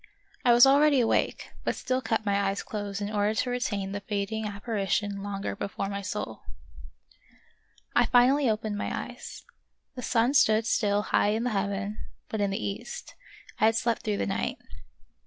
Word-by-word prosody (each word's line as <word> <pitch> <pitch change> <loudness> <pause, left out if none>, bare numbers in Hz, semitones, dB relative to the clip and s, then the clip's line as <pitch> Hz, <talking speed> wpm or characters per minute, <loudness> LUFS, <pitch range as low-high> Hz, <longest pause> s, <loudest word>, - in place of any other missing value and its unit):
I 245 - +5
was 240 +1 +8
already 285 +1 +5
awake, 235 - 0
but - - 0
still 255 0 -1
kept 225 -2 -1
my 200 -1 +2
eyes 195 - -3
closed 205 -4 -4
in 205 - -3
order 210 +1 +1
to 250 - 0
retain 205 -6 -2
the 205 - -3
fading 205 +2 -2
appari 205 -1 -3
tion 200 0 0
longer 200 0 -4
before 200 0 -4
my 200 0 -3
soul. 200 - -5 1.5
I - - +4
finally 255 +2 +4
opened 215 -1 -2
my - - -2 0.2
eyes; - - -10 0.5
the 255 - -7
sun 240 +2 +2
stood 220 -6 +4
still 205 -2 +1
high - - +4
in 220 +2 0
the 245 - 0
heaven, 200 0 -2 0.3
but 220 - -2
in 200 - +2
the 195 - -2
east; 480 - -6 0.5
I - - +4
had 225 0 +4
slept 230 0 0
through 210 -2 -1
the - - -1
night. 195 - -2
210 Hz, 175 wpm, -28 LUFS, 200-235 Hz, 1.5 s, was